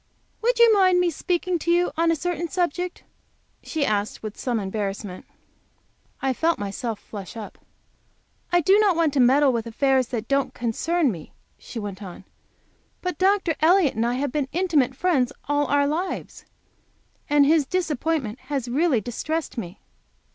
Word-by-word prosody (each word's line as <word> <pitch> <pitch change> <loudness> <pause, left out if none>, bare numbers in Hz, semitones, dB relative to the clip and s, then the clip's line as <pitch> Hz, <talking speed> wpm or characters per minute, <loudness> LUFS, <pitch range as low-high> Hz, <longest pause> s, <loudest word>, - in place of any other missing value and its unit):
"Would 480 +2 +2
you 470 -1 +7
mind 370 -3 +4
my 355 -1 +3
speaking 355 +2 -1
to 340 - -4
you 350 +1 +3
on 330 +1 +2
a 330 - +3
certain 345 +2 -2
subject?" 355 0 -2 0.6
she 310 -3 -2
asked, 210 -1 -1
with 215 -1 -5
some 240 -3 -2
embarrassment. 195 -1 -4 1.0
I 265 -1 +2
felt 325 +5 +1
myself 205 +3 -4
flush 205 +2 -9
up. 215 - -9 0.9
"I 350 0 +4
do 385 +6 +5
not 405 -4 +4
want 325 -3 +2
to 280 - +1
meddle 265 +2 +5
with 230 -1 -2
affairs 260 +2 +2
that 230 -3 -4
don't 275 0 0
concern 280 +6 0
me," 165 -6 -9 0.3
she - - -10
went 205 -2 -5
on, 185 -3 -9 0.8
"but 360 -4 -3
Dr. 380 -3 +3
Elliott 335 -1 +4
and 225 - -1
I 240 +1 0
have 275 +1 -2
been 290 -1 -1
intimate 305 -8 +1
friends 280 -6 +1 0.2
all 290 0 +1
our 285 0 +3
lives. 335 +6 -3 0.8
And 290 -1 +5
his 305 -1 +3
disappointment 310 -8 -1
has 275 -4 -2
really 270 -1 +2
distressed 310 +8 -3
me." 185 -7 -6
285 Hz, 160 wpm, -24 LUFS, 235-345 Hz, 1.0 s, you